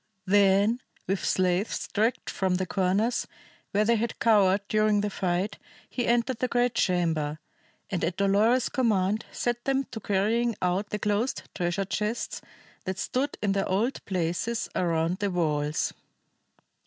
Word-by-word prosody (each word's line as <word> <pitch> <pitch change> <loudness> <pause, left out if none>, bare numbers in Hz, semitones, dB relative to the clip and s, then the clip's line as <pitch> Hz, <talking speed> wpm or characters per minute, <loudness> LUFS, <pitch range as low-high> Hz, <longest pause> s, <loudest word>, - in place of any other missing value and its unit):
Then 200 +3 +4 0.3
with 190 -1 -1
slaves 185 +2 0
dragged 225 +4 0
from 190 -1 0
the 185 +1 -1
corners 195 +6 +1 0.4
where 210 +2 +2
they 230 +1 +3
had 230 +2 -2
cowered 205 -3 +4
during 215 -1 +3
the 205 0 -2
fight, 185 +1 -1 0.3
he 245 - -1
entered 240 +1 +1
the 255 - +1
great 245 0 +1
chamber, 165 -7 +1 0.5
and 185 - -1
at 170 +2 -1
Dolores's 210 +6 +3
command 215 -5 +1
set 240 0 -2
them 270 0 +2
to 225 - -5
carrying 220 +4 +1
out 185 +3 0
the 210 - -2
closed 210 +5 -1
treasure 175 +1 -1
chests 210 +4 -2 0.4
that 190 0 -3
stood 265 +8 -1
in 205 - +2
their 195 0 0
old 215 +8 0
places 185 +5 -1
around 170 +1 0
the 205 -1 0
walls. 150 -4 0
200 Hz, 145 wpm, -27 LUFS, 185-230 Hz, 0.5 s, Then